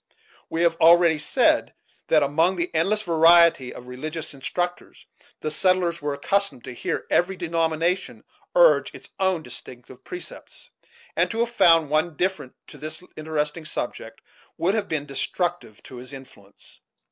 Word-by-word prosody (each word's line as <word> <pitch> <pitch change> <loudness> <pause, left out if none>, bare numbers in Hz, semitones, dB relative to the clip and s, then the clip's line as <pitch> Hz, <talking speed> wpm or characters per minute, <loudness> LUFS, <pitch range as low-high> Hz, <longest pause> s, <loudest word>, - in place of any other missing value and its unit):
We 165 +1 -1
have 165 -1 +2
already 170 -1 +5
said - - +2 0.3
that, - - +4
among 165 +6 +2
the 175 0 -3
endless 195 +7 +1
variety 165 -5 +5
of 125 - -11
religious 150 +6 -6
instructors, 175 +6 -5 0.4
the 155 - -2
settlers 175 0 +1
were 145 -1 -2
accustomed 200 -1 -1
to 130 - -8
hear - - -4
every 190 +2 +2
denomination 165 +1 -1 0.3
urge - - +4
its - - -13
own 190 -4 +1
distinctive 125 0 -11
precepts, 360 - -10 0.4
and - - +2
to 230 0 -2
have 235 0 -1
found 165 -9 +4
one 155 +2 +2
indifferent 175 -4 -3
to 150 - -14
this 155 +3 -7
Interesting 155 +1 -3
subject - - -5 0.4
would 185 +4 +1
have 215 -2 -1
been 155 -3 -2
destructive 150 - -3
to 130 - -11
his 125 +3 -10
influence. 115 -7 -15
165 Hz, 145 wpm, -24 LUFS, 145-180 Hz, 0.4 s, already